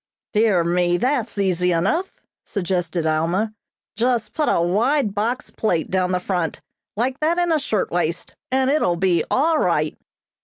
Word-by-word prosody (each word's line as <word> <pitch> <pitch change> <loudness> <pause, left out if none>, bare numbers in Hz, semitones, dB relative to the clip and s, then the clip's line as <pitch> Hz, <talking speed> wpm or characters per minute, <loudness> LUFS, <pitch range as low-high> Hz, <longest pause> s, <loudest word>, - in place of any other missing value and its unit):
"Dear 210 -5 +3
me, 175 +1 +2
that's 245 -2 -1
easy 180 -2 +1
enough," 205 - 0 0.3
suggested 175 -4 -2
Alma, 170 +8 0 0.4
"just 230 -1 0
put 305 - 0
a - - +2
wide 210 - +1
box 225 +5 -2
plait 175 -8 -1
down 185 -1 +1
the 180 - +1
front, 180 -3 -2 0.4
like 255 +4 -1
that 320 +3 +1
in 350 -1 +1
a 315 - +3
shirtwaist, 175 - -2 0.2
and 265 +1 +2
it 305 - +2
will 175 - +2
be 175 -2 +2
all 315 +3 +2
right." - - +1
200 Hz, 155 wpm, -22 LUFS, 175-255 Hz, 0.4 s, Dear